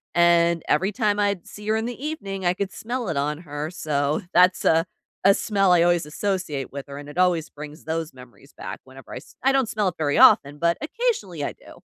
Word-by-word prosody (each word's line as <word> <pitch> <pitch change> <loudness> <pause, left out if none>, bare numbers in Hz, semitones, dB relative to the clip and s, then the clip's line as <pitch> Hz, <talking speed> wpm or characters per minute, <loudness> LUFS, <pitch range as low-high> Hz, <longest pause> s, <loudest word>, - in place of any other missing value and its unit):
and 170 -1 +4
every 190 +7 +2
time 210 -2 0
I'd 200 -3 0
see 210 0 -11
her 215 - +2
in 220 +1 -1
the 245 +2 -6
evening, 200 -11 -5
I 175 - +3
could 195 0 -3
smell 240 -2 -4
it 160 - -2
on 150 +2 -1
her, 150 -2 -5
so, 150 -1 -1
that's 180 +1 +4
a 165 +1 +4 0.4
a 195 - +8
smell 195 -3 +2
I 175 - +5
always 175 -2 +2
associate 155 -4 -3
with 140 0 -7
her 140 0 -8
and 145 0 -9
it 145 - -11
always 175 -3 +2
brings 150 +2 -10
those 160 0 -3
memories 130 +2 -16
back - - -7
whenever 130 0 -14
I - - -5
s 125 - -13
I 270 - +4
don't 270 -3 +2
smell 210 -3 0
it 175 - -10
very 145 -2 0
often, 145 +1 +6
but 170 +1 +2
occasionally 295 - -2
I - - -2
do. - - -16
170 Hz, 225 wpm, -23 LUFS, 150-200 Hz, 0.4 s, a